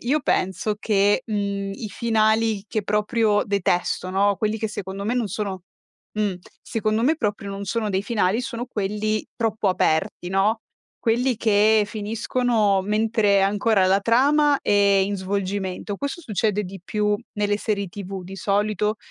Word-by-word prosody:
io 280 +6 +1
penso 190 +1 0
che, 205 +2 +2
mhmm, 200 -2 -2
i 215 - -6
finali 220 -1 +1
che 215 0 -2
proprio 210 +1 +1
detesto, 185 -2 0
no, 200 +2 +2
quelli 215 +2 -1
che 220 0 -2
secondo 195 -1 -6
me 230 +4 0
non 245 -3 0
sono 195 -2 -4 0.5
mh, 210 -3 0 0.3
secondo 215 -1 -1
me 305 +6 +3
proprio 205 -6 -2
non 195 0 -5
sono 215 +2 -1
dei 190 0 0
finali, 205 0 +1
sono 240 0 -5
quelli 215 -1 -2
troppo 220 -3 0
aperti, 180 +1 0
no, 205 +4 +2 0.4
quelli 245 +2 +1
che 215 0 +4
finiscono 215 -1 0
mentre 210 0 +2
ancora 200 0 +2
la 190 +1 +4
trama 285 +6 +3
è - - -2
in 200 -1 +3
svolgimento. 195 +1 -3
Questo 280 - -4
succede 210 - -1
di 195 +1 -8
più 210 0 0 0.2
nelle 205 -1 0
serie 200 -3 -2
TV 195 0 -7
di 190 +2 -9
solito, 210 +2 0
210 Hz, 150 wpm, -23 LUFS, 195-220 Hz, 0.5 s, che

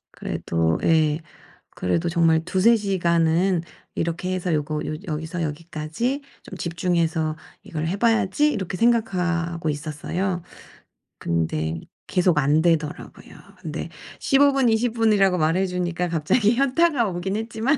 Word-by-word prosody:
그래도 80 -1 -1
예. 155 -1 +3 0.6
그래도 165 - 0
정말 165 -1 +3
'2-3 195 +6 +4
시간은 175 -2 +1 0.3
이렇게 175 +3 -2
해서 180 -2 -2
요거 150 0 -1
요 155 - -3
여기서 160 +3 -3
여기까지 160 - -3 0.2
좀 185 - -10
집중해서 165 -2 0 0.3
이걸 165 -6 -4
해 190 - -1
봐야지.' 230 +6 +2
이렇게 190 -3 -3
생각하고 180 -8 +1
있었어요. 165 +5 -3 0.8
근데 80 -1 -1 0.3
계속 180 -3 +2
안 150 +2 +3
되더라고요. 160 -3 -2 0.2
근데 - - -5 0.3
15 280 +1 +4
분 270 -3 +2
20 225 +1 +1
분이라고 205 -5 +3
말해 165 +5 +2
주니까 180 -1 -2
갑자기 205 +8 +2
현타가 275 -2 +2
오긴 190 +3 -3
했지만 225 +5 0
175 Hz, 275 characters per minute, -23 LUFS, 160-205 Hz, 0.8 s, 2-3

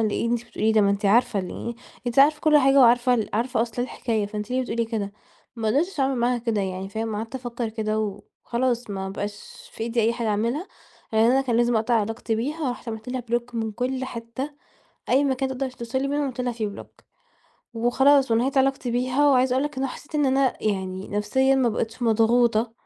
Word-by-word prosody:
اللي 215 +1 0
أنتِ 240 0 -1
بتقوليه 220 -2 0
ده؟ 220 - +4
ما 200 - +3
أنت 200 +1 0
عارفة 220 0 +3
ال 195 +5 -5 0.3
أنتِ 240 +2 -1
عارفة 300 +2 +5
كل 305 -1 +5
حاجة 270 0 +4
وعارفة 245 +1 +5
ال 225 -3 -1
عارفة 235 +1 +1
أصل 235 +1 -3
الحكاية 225 -4 -2
فأنت 210 +2 -6
ليه 255 +1 +1
بتقولي 235 -1 -1
كده؟ 215 -3 -3 0.4
ما 220 -1 -1
قدرتش 305 - 0
اعمل 270 0 +1
معاها 240 +1 +1
كده 230 -3 -1
يعني 190 0 -4
فاهم، 220 +1 -3
قعدت 225 +4 -6
أفكر 240 -2 -4
كده 215 -1 -2 0.5
وخلاص 240 -1 -1
ما 190 -1 -4
بقاش 205 +1 -7
في - - -6
أيدي 235 +1 0
أي 230 +1 +2
حاجة 235 -1 -2
أعملها. 235 - -1 0.5
يعني 220 +1 +4
أنا 260 +3 +4
كان 250 -4 0
لازم 240 0 +3
أقطع 225 +2 +1
علاقتي 225 +1 -1
بيها 290 +7 -2
ورُحت 245 -1 -6
عملت 220 +1 -6
لها 255 0 -2
block 240 +1 -1
من 225 -2 -2
كل 255 +3 -2
حتة 235 +3 -6 0.6
أي 270 +3 +4
مكان 265 -1 0
تقدر 265 0 -3
توصل 250 +1 -4
لي 275 - -1
منه 290 +1 0
عملت 255 -2 -4
لها 250 -1 -1
فيه 225 -2 -3
block. 200 - -12 0.7
وخلاص 265 +3 +3
ونَهِيت 255 +4 +2
علاقتي 270 -2 +1
بيها 255 +4 +2
وعايزة 255 -1 +3
أقول 265 +2 +1
لك 295 -2 -5
إن 260 - -2
هو 270 - +1
أنا - - -7
حسيت 305 - -16
إن 295 -2 +2
أنا 265 0 +2
يعني 190 -2 -2
نفسيًا 235 +7 +2
ما 260 -2 +3
بقيتش 225 +2 -3
مضغوطة 230 0 +3
235 Hz, 215 wpm, -24 LUFS, 220-260 Hz, 0.7 s, عارفة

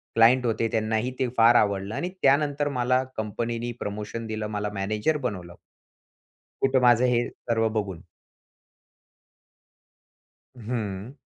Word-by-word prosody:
Client 120 +3 +5
होते 115 0 0
त्यांनाही 110 +2 0
ते 130 - +1
फार 115 +1 +6
आवडलं 100 -1 +1
आणि 175 - -2
त्यानंतर 145 +1 +2
मला 125 +1 +2
कंपनीनी 115 +2 -3
प्रमोशन 105 +2 -5
दिलं, 110 -1 -3
मला 105 -1 -3
मॅनेजर 105 +10 0
बनवलं. 95 -10 -5 1.1
कुठं 135 -1 +3
माझं 120 0 +5
हे 120 -1 +2
सर्व 115 -1 -1
बघून. 95 -4 -6 2.5
हं. 110 -1 -4
115 Hz, 110 wpm, -25 LUFS, 105-125 Hz, 2.5 s, फार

